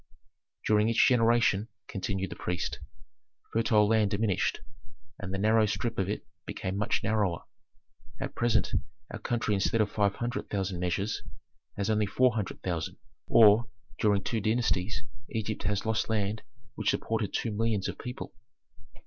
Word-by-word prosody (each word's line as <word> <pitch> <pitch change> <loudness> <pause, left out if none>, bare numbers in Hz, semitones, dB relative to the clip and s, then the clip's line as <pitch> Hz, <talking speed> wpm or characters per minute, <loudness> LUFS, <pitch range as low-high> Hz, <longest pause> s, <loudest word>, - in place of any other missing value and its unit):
"During 105 +1 +4
each 115 - +5
generation," 115 -4 +3 0.2
continued 95 -2 -3
the - - -5
priest, 90 -1 -3 0.7
"fertile 110 -2 +4
land 110 -1 +3
diminished, 100 -2 0 0.6
and 100 -2 -5
the 95 - -1
narrow 110 +2 +4
strip 115 +1 -2
of 95 0 0
it 105 - -3 0.2
became 95 +1 -3
much 105 +1 0
narrower. 100 -5 0 0.8
At 135 0 -4
present 115 -2 +2 0.4
our - - -5
country 115 -3 0
instead 100 +3 +1
of 105 -2 +2
five 100 -2 +1
hundred 120 +1 -3
thousand 95 -3 -2
measures 95 +4 -1 0.6
has 100 +2 0
only 105 -1 +2
four 125 +4 +3
hundred 105 -4 -4
thousand 85 -3 -3 0.3
or 110 +1 +6 0.3
during 100 -2 +3
two 110 +2 -1
dynasties 110 -2 0 0.3
Egypt 110 -1 -3
has 105 0 0
lost 110 0 0
land 105 0 0 0.3
which 110 -4 -1
supported 110 -3 -1
two 115 - -1
millions 105 -2 0
of - - -5
people." 125 0 -6
105 Hz, 150 wpm, -29 LUFS, 100-115 Hz, 0.8 s, or